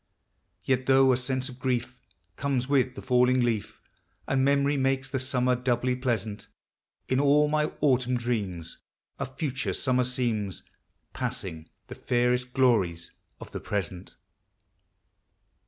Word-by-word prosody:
Yet, 130 -1 0
though 135 -1 +6
a - - +3
sense 130 0 -2
of 130 -2 -10
grief 125 -1 -2 0.4
Comes 135 -3 -1
with 130 -2 +2
the - - -8
falling 125 0 +3
leaf, 110 -2 -2 0.4
And 135 0 +2
memory 140 +1 +3
makes 135 0 0
the 135 - -2
summer 125 -1 +1
doubly 125 0 0
pleasant, 115 -5 -2 0.6
In 130 - +1
all 145 +1 +4
my 150 0 +1 0.2
autumn 125 -3 +2
dreams 100 -9 -3 0.4
A 140 - -2
future 135 +1 -3
summer 125 -1 +2
gleams, 115 -6 -2 0.5
Passing 80 0 -4 0.2
the - - -9
fairest 125 0 0
glories 105 -11 +2 0.3
of - - -10
the - - -5
present! 95 -3 -4
125 Hz, 130 wpm, -27 LUFS, 120-135 Hz, 0.6 s, though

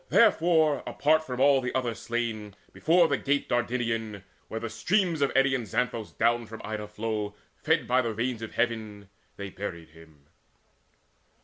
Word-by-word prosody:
Therefore 160 -3 +4
apart 155 +2 +2
from 125 -4 -5
all 135 0 +5
the 125 -1 -4
other 125 -3 0
slain, 115 -3 -4 0.2
Before 170 +1 +4
the 140 -3 +1
Gate 145 +1 0
Dardanian 115 -4 -1 0.2
where 110 - -4
the 115 - -4
streams 180 - 0
Of 140 - +2
eddying 135 -3 +2
Xanthus 115 +1 -2
down 115 0 +2
from 110 +1 -9
Ida 105 -1 -4
flow 105 -1 -3 0.2
Fed - - +1
by 125 +1 +3
the 115 - -2
rains 120 0 -2
of 115 - -6
heavens 110 -3 -2 0.3
they 100 -1 -6
buried 85 -5 -6
him. 80 -3 -18
115 Hz, 155 wpm, -28 LUFS, 105-135 Hz, 0.3 s, all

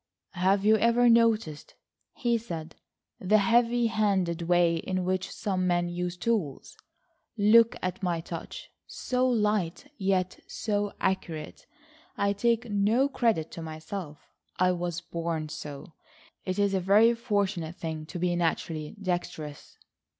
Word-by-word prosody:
"Have 195 +2 +2
you 220 +1 +6
ever 235 +2 +4
noticed," 225 -10 +2 0.4
he 240 -3 +1
said, 165 -8 -7 0.4
"the 210 +3 +3
heavy 235 +3 +3
handed 195 -6 +1
way 170 0 +3
in 185 +2 -2
which 185 0 -1
some 185 -4 -2
men 175 -1 +1
use 175 0 -3
tools? 185 - -2 0.6
Look 225 +2 +5
at 185 +1 -3
my 175 -3 0
touch,—so 250 +9 -4
light, 210 - 0
yet 190 -2 0
so 205 -2 -2
accurate. 165 -5 -3 0.5
I 200 0 +1
take 235 +3 +1
no 215 +6 +2
credit 225 - 0
to 165 - -7
myself. 160 0 -6 0.4
I 185 0 +3
was 175 -1 -3
born 165 -2 -3
so. 150 +1 -8 0.5
It's 185 0 -2
a 200 -1 +2
very 205 +6 +5
fortunate 200 -7 -1
thing 160 -3 -5
to 180 - -6
be 175 0 0
naturally 165 -1 -2
dexterous." 175 -6 -4
185 Hz, 130 wpm, -28 LUFS, 170-215 Hz, 0.6 s, you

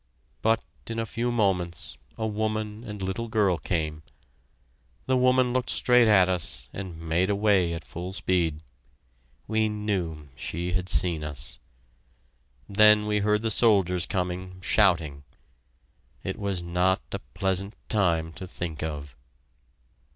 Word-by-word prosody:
But 115 +1 +2 0.2
in 115 - -4
a 115 - -1
few 120 +3 -2
moments 90 -7 0 0.2
a 110 - -2
woman 110 0 -2
and 105 -4 -6
little 95 +5 -2
girl 105 -7 +2
came. 80 -1 -2 1.0
The 130 - +2
woman 125 -1 +3
looked 125 -1 0
straight 125 -2 +5
at 95 -4 +6
us, 85 -9 -1
and 95 -4 -6
made 85 +3 0
away 100 -4 +3
at 85 - -6
full 90 +2 -6
speed. 85 -5 0 0.8
We 110 0 +1
knew 90 -8 -3
she 85 +5 -4
had 90 0 -1
seen 85 -4 +2
us. 75 -1 -5 1.1
Then 105 +1 +6
we 105 0 +1
heard 105 +1 +1
the 115 - +1
soldiers 95 -6 +3
coming, 90 0 -3
shouting. 80 -9 +2 1.0
It - - -4
was 100 -4 -2
not 90 +2 +1
a - - -3 0.2
pleasant 95 +1 -1
time 85 -6 +1
to 95 +2 -8
think 85 -4 -5
of. 75 -4 -5
95 Hz, 135 wpm, -27 LUFS, 85-105 Hz, 1.1 s, at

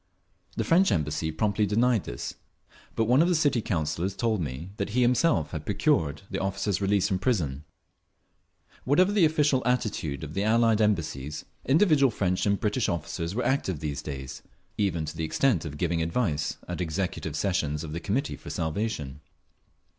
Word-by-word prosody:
The - - +1
French 185 +4 +4
Embassy 75 0 0
promptly 105 +5 +1
denied 115 +1 +2
this, - - -5 0.6
but 115 - +2
one 125 +6 +4
of 170 - +4
the 180 - +2
City 145 -6 +2
Councillors 85 +1 -2
told 110 -5 0
me 75 +5 -5
that 100 - -2
he 125 - +5
himself 125 - +2
had 80 -3 -5
procured 90 - +1
the - - -2
officer's 95 0 -1
release 100 -1 +2
from 95 -3 -1
prison…. 80 - -1 1.2
Whatever 180 +9 +4
the 205 -5 +4
official 150 -4 +2
attitude 110 - -1
of 75 -1 -6
the 100 - -1
Allied 110 0 +3
Embassies, 75 -8 -1 0.2
individual 150 -2 +5
French 90 -3 0
and 100 0 +2
British 110 +1 0
officers 85 +1 -3
were 125 - -1
active 95 - 0
these 75 -1 -3
days, 65 -3 -7 0.3
even 85 -6 0
to 75 - -6
the 80 - -3
extent 95 - +1
of 75 -1 -6
giving 85 0 0
advice 80 -3 -1
at 90 +1 -4
executive 85 -2 -3
sessions 75 -4 -1
of 80 - -6
the 80 - -3
Committee 125 +11 -1
for - - -10
Salvation. 80 -5 -3
95 Hz, 170 wpm, -27 LUFS, 80-120 Hz, 1.2 s, he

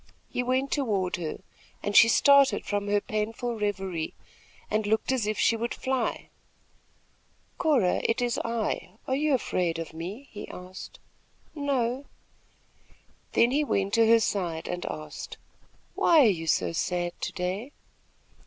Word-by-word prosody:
He - - -1
went 260 +2 0
toward 205 -11 0
her, 165 0 -5 0.4
and 205 0 -2
she - - +9
started 280 +3 +5
from 205 0 -2
her 205 0 +3
painful 220 +3 -3
reverie 195 -6 -2 0.6
and 215 -1 +1
looked 220 +4 +1
as 250 -5 0
if 215 - -1
she 230 - +3
would 235 +1 -3
fly. 260 -3 -2 1.3
"Cora, 265 - +2
it 230 - +1
is 245 -1 0
I, 225 -5 -2
are 260 - +1
you 295 0 +2
afraid 180 -8 -1
of 165 -1 -6
me?" 190 +12 -7
he 205 - -8
asked. 180 +1 -9 0.6
"No." 275 -3 -1 1.3
Then 235 +1 +4
he 295 +3 +2
went 200 -8 0
to 230 -1 +5
her 230 0 +6
side 175 -7 -2
and 180 0 -4
asked: 155 -1 -7 0.6
"Why 330 -3 +5
are - - +6
you 165 -4 -2
so - - +2
sad 175 +1 -1
to - - -2
day?" 190 +8 -3
215 Hz, 145 wpm, -27 LUFS, 185-255 Hz, 1.3 s, she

